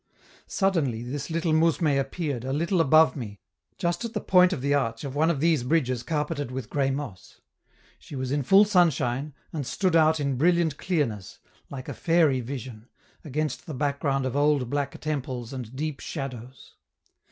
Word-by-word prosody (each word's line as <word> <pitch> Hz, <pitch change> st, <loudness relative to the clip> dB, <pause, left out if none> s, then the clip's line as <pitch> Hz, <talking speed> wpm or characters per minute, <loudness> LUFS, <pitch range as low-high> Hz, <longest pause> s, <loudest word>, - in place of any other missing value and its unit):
Suddenly 155 Hz, -, 0 dB
this 135 Hz, +5 st, -5 dB
little 165 Hz, 0 st, 0 dB
mousme 165 Hz, +1 st, +3 dB
appeared, 135 Hz, -2 st, -2 dB
a 130 Hz, -, -3 dB
little 170 Hz, +5 st, +1 dB
above 155 Hz, +2 st, +5 dB
me, 105 Hz, -7 st, -7 dB, 0.4 s
just 175 Hz, +6 st, -1 dB
at 230 Hz, -1 st, -5 dB
the -, -, +1 dB
point 180 Hz, 0 st, +5 dB
of 165 Hz, -, -2 dB
the 140 Hz, +1 st, +1 dB
arch 115 Hz, -5 st, 0 dB
of 140 Hz, -2 st, -5 dB
one 155 Hz, +3 st, +2 dB
of 160 Hz, -5 st, 0 dB
these 160 Hz, -2 st, +3 dB
bridges 130 Hz, -2 st, 0 dB
carpeted 150 Hz, -1 st, -2 dB
with 130 Hz, -3 st, -6 dB
gray 140 Hz, -2 st, +1 dB
moss; 135 Hz, -9 st, -6 dB, 0.6 s
she -, -, -10 dB
was 130 Hz, -1 st, -3 dB
in 145 Hz, +1 st, +1 dB
full 195 Hz, +9 st, +6 dB
sunshine, 150 Hz, -, +1 dB, 0.2 s
and 155 Hz, -3 st, -2 dB
stood 180 Hz, +6 st, 0 dB
out 160 Hz, -1 st, +4 dB
in 140 Hz, -3 st, -1 dB
brilliant 170 Hz, 0 st, +2 dB
clearness, 130 Hz, -, -2 dB, 0.3 s
like 130 Hz, -2 st, -7 dB
a -, -, -4 dB
fairy 165 Hz, -6 st, +2 dB
vision, 125 Hz, -2 st, -7 dB, 0.4 s
against 150 Hz, -1 st, -3 dB
the 155 Hz, -, -5 dB
background 140 Hz, -1 st, 0 dB
of 130 Hz, 0 st, -2 dB
old 145 Hz, -4 st, +2 dB
black 140 Hz, -1 st, -2 dB
temples 130 Hz, -5 st, -4 dB
and 125 Hz, -2 st, -7 dB
deep 150 Hz, 0 st, -3 dB
shadows. 130 Hz, -4 st, -7 dB
145 Hz, 175 wpm, -26 LUFS, 130-160 Hz, 0.6 s, full